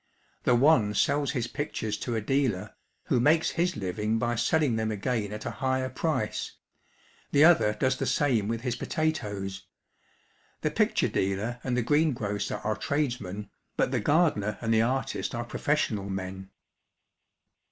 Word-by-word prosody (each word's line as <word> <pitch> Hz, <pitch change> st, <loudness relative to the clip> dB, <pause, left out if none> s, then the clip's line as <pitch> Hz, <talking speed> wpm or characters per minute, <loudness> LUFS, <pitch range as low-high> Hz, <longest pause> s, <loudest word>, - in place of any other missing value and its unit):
The 125 Hz, -, +5 dB
one 120 Hz, -6 st, +4 dB
sells 140 Hz, 0 st, +2 dB
his 120 Hz, -5 st, -1 dB
pictures 115 Hz, -5 st, -3 dB
to 120 Hz, -, -3 dB
a 110 Hz, -, 0 dB
dealer, 125 Hz, -5 st, 0 dB, 0.3 s
who -, -, +1 dB
makes 155 Hz, +6 st, +3 dB
his 175 Hz, -2 st, 0 dB
living 105 Hz, +3 st, -1 dB
by 120 Hz, +1 st, 0 dB
selling 120 Hz, +2 st, +2 dB
them 110 Hz, 0 st, -1 dB
again 105 Hz, 0 st, -2 dB
at 105 Hz, 0 st, -6 dB
a 120 Hz, -, -2 dB
higher 130 Hz, 0 st, 0 dB
price; 130 Hz, -4 st, -2 dB, 0.8 s
the 145 Hz, +2 st, +6 dB
other 165 Hz, -11 st, +5 dB
does 130 Hz, +4 st, +1 dB
the -, -, -2 dB
same 120 Hz, -8 st, +2 dB
with 115 Hz, +1 st, -2 dB
his 125 Hz, -1 st, -2 dB
potatoes. 105 Hz, -11 st, -3 dB, 0.9 s
The -, -, 0 dB
picture -, -, +2 dB
dealer 100 Hz, +6 st, -1 dB
and 125 Hz, -1 st, -1 dB
the 125 Hz, -, +1 dB
greengrocer 120 Hz, -8 st, 0 dB
are 110 Hz, 0 st, 0 dB
tradesmen, 110 Hz, -6 st, -2 dB, 0.3 s
but -, -, +2 dB
the 130 Hz, -, +1 dB
gardener 105 Hz, -, +2 dB
and 115 Hz, -1 st, 0 dB
the 110 Hz, -, +4 dB
artist 130 Hz, +2 st, -1 dB
are 120 Hz, 0 st, -3 dB
professional 115 Hz, -7 st, -1 dB
men. 95 Hz, 0 st, -5 dB
120 Hz, 150 wpm, -28 LUFS, 105-140 Hz, 0.9 s, the